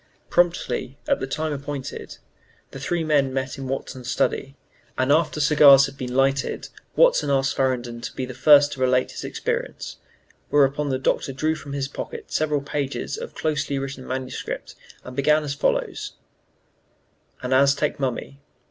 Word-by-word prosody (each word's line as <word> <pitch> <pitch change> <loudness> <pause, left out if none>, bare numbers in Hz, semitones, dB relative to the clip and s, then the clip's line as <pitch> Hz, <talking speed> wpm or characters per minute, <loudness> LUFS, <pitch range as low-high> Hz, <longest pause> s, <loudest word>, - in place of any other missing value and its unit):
Promptly 175 -6 +1
at - - +2
the 135 - -3
time 155 +2 -2
appointed, 140 -1 -6 0.5
the 135 - -8
three 165 +5 -1
men 145 -4 +2
met 130 +1 -3
in 135 - -5
Watson's 130 -1 -5
study, 135 +1 0 0.4
and 130 +2 +2
after 155 0 +2
cigars 140 -2 +7
had 135 0 -8
been 125 -2 -5
lighted 135 0 +1 0.3
Watson - - +4
asked 135 -1 +2
Farrington 120 -3 -1
to - - -6
be 130 - -2
the 130 - -8
first 145 +2 +6
to 135 - -7
relate 125 0 +2
his - - -7
experience, - - -4 0.5
whereupon 145 0 +3
the 130 - 0
Doctor 135 +1 0
drew 155 +4 0
from 150 -3 -8
his 140 -1 -2
pocket 140 - -7
several 150 -2 +1
pages 140 -1 -3
of 475 +2 -8
closely 150 -2 -1
written 135 -1 -5
manuscript, 130 0 -5 0.3
and 125 - -9
began 150 +3 +3
as 145 -2 -3
follows: 140 - -1 1.3
AN 125 +1 0
AZTEC 140 +3 +3
MUMMY. 135 +1 -3
140 Hz, 155 wpm, -24 LUFS, 130-150 Hz, 1.3 s, cigars